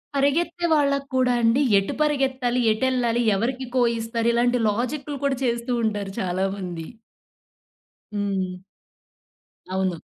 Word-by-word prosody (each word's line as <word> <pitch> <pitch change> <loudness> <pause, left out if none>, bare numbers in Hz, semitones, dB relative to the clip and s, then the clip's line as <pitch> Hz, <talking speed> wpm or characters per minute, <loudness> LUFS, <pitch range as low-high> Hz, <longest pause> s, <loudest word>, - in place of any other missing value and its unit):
పరిగెత్తే 330 +5 +1
వాళ్ళకి 280 -2 +2
కూడా 255 -1 +3
అండి, 230 +4 +3 0.2
ఎటు 195 - -3
పరిగెత్తాలి, 265 -4 +1
ఎటెళ్ళాలి, 240 0 +1
ఎవరికి 255 +5 -2
కో 250 - +4 0.2
ఇస్తారు, 230 +1 -1
ఇలాంటి 245 +1 +2
లాజిక్కులు 270 +6 -3
కూడా 270 -2 +1
చేస్తూ 235 +1 -1
ఉంటారు 205 -3 -1
చాలామంది. 185 -2 -2 1.3
హ్మ్. 190 -3 -2 1.1
అవును. 185 -3 -1
240 Hz, 105 wpm, -24 LUFS, 200-265 Hz, 1.3 s, కో